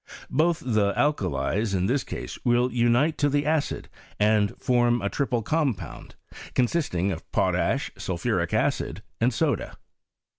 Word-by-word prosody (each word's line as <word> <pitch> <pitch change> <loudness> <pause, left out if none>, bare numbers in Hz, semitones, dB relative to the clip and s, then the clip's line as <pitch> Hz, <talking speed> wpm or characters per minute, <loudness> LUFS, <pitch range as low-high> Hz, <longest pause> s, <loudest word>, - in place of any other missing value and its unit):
Both 160 +4 +2
the 105 -5 +2
alkalies, 100 - 0
in 90 0 +1
this 130 +5 +1
case, - - -7
will 120 +1 +2
unite 120 +6 +2
to 145 - +3
the 145 0 +1
acid 155 -1 -1 0.3
and 105 -1 +2
form 120 -2 +2
a 100 -2 -1
triple 125 -5 -1
compound, 125 - -2 0.4
consisting 120 - +1
of 80 - -7
potash, - - +1
sulphuric - - -1
acid, - - -1 0.2
and 120 +3 +3
soda. 110 - -1
120 Hz, 135 wpm, -26 LUFS, 100-145 Hz, 0.4 s, to